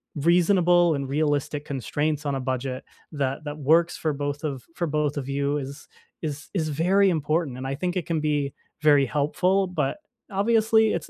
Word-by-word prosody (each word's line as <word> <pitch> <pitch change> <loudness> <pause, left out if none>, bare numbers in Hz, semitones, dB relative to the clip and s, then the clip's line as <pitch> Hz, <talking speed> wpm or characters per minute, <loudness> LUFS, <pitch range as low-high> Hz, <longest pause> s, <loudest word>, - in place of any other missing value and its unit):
reasonable 175 +1 +4
and 140 -1 -3
realistic 145 0 0
constraints 145 +3 -2
on 140 -1 0
a - - -2
budget 130 0 -3 0.3
that 140 +1 -2
that 145 +1 -5
works 165 +4 +3
for 155 - -1
both 145 +1 -3
of 135 -5 -4
for 170 - -1
both 150 -1 0
of 135 -1 -4
you 140 +1 0
is 140 +1 -7 0.3
is 150 -1 -5
is 160 -5 0
very 185 +6 +3
important 155 -3 0
and 130 - -6
I 135 - -2
think 180 +4 -2
it 180 - -1
can 165 -2 -1
be 145 -2 0 0.3
very 145 -3 +5
helpful 180 +8 +1
but 160 - -1 0.3
obviously, 220 +2 +3
it's 170 - -4
150 Hz, 180 wpm, -25 LUFS, 140-175 Hz, 0.3 s, very